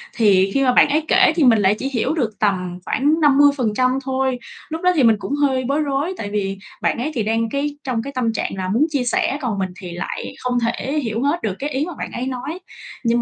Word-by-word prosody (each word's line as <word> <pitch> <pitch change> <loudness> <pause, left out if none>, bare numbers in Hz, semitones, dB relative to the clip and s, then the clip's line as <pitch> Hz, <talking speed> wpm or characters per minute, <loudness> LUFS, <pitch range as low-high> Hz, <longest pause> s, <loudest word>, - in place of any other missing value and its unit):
thì 195 -4 +4
khi 275 - +2
mà 250 - +3
bạn - - +5
ấy 305 +2 +1
kể 375 -4 +5
thì 330 - +2
mình 230 -5 +5
lại 200 +1 +3
chỉ 270 - -2
hiểu 260 +3 0
được 220 -9 -2
tầm 185 -4 -1
khoảng 295 +4 +1
50% 270 -4 +3
thôi. 265 -1 -1 0.3
Lúc 320 +1 -4
đó 365 - +4
thì 280 - +3
mình 225 -1 +5
cũng 280 - -3
hơi 270 -3 +1
bối 290 +2 +1
rối, 290 +5 -1
tại 205 - -5
vì 195 -1 -2 0.2
bạn - - +1
ấy 295 +6 -2
thì 230 - 0
đang 225 +1 0
cái 285 +2 -2
trong 250 -4 -1
cái 280 - -7
tâm 235 -3 0
trạng - - -2
là 185 -1 -3
muốn 235 +10 +3
chia 280 -5 0
sẻ, 255 +3 0
còn 220 -7 -2
mình 190 - -1
thì 180 - -7
lại 175 - -5
không 250 -1 0
thể 260 +5 -1
hiểu 225 +2 -2
hết 295 +5 0
được 205 -4 -1
cái 285 - -2
ý 285 +2 -1
mà 355 - -6
bạn - - -5
ấy 245 - -4
nói. 265 +7 -5 0.4
Nhưng 235 0 +2
255 Hz, 250 wpm, -20 LUFS, 220-285 Hz, 0.4 s, bạn